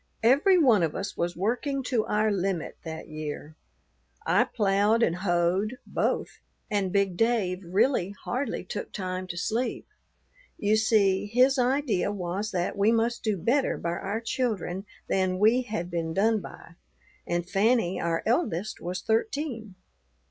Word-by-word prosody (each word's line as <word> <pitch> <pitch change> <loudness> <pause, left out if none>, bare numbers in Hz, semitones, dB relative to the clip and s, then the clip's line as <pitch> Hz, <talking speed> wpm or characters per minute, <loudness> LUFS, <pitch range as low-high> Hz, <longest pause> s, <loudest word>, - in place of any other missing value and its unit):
Every 285 - +5
one 245 - +5
of 165 -3 0
us 200 - -4
was 175 0 -2
working 250 - -1
to 245 -4 0
our 215 +1 +2
limit 190 -4 -2
that 160 -1 -7
year. 155 0 -6 0.7
I - - +4
ploughed 210 +2 +2
and 170 -3 +1
hoed, 185 +5 0
both, - - -2 0.3
and 200 -3 0
big 200 -2 +1
Dave 200 -4 +1
really 195 +2 +1
hardly 265 +3 -2
took 465 - -6
time 185 -1 -4
to 175 - -6
sleep. 225 +7 -2 0.7
You 210 +1 +2
see, 205 -3 +3
his 255 +5 +3
idea 250 -6 +1
was 195 +2 -3
that 180 -3 -2
we 205 +2 +3
must 230 +1 0
do 215 -3 0
better 255 - +1
by 170 - -3
our 195 +5 -3
children 210 -6 -2 0.2
than 185 -1 +1
we 220 +6 +4
had 210 -7 -4
been 165 -1 -2
done 220 +3 +3
by, 170 -3 -12 0.5
and 175 0 -1
Fanny, 200 -1 +2
our 165 -1 -1
eldest, 220 - -1
was 180 +2 -4
thirteen. 225 - -2
205 Hz, 150 wpm, -27 LUFS, 180-230 Hz, 0.7 s, Every